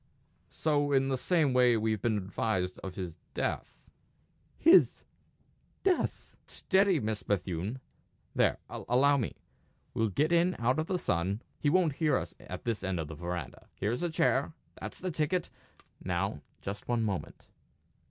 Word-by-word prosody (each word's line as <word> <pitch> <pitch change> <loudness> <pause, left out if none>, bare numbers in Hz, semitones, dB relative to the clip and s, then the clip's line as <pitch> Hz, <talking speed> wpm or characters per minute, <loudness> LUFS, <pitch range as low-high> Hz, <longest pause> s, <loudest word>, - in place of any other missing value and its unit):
"So 145 -2 +1
in 135 -1 +3
the 135 - +1
same 150 0 +2
way 125 -2 +5
we've 110 -2 0
been 110 -3 +1
advised 95 -1 -1
of 95 -2 -7
his 90 -3 -5 0.2
death." - - -2 0.8
"His 340 +4 +6 0.8
death!" 380 -2 0
"Steady, 190 -3 +2
Miss 110 -3 -2
Bethune! 95 +4 -2 0.5
There - - +3
allow 140 +4 +2
me. 120 -7 -2 0.6
We'll 115 -1 +1
get 150 - +1
in 175 +2 +3
out 125 +5 +1
of 160 - -1
the 185 - 0
sun; 95 - -1 0.2
he 145 - +2
won't 170 -2 +3
hear 150 -5 +3
us - - -5
at - - -8
this 115 -4 -2
end 95 -2 -1
of 80 -2 -4
the - - -6
verandah. 85 -3 -5
Here's 110 - -1
a 175 - 0
chair. 160 -3 +1 0.3
That's - - -6
the 185 -1 -2
ticket! 160 +3 -1 0.5
Now, - - -1 0.2
just 100 +1 -5
one 120 -2 +1
moment." 100 -4 -4
125 Hz, 150 wpm, -31 LUFS, 100-155 Hz, 0.8 s, His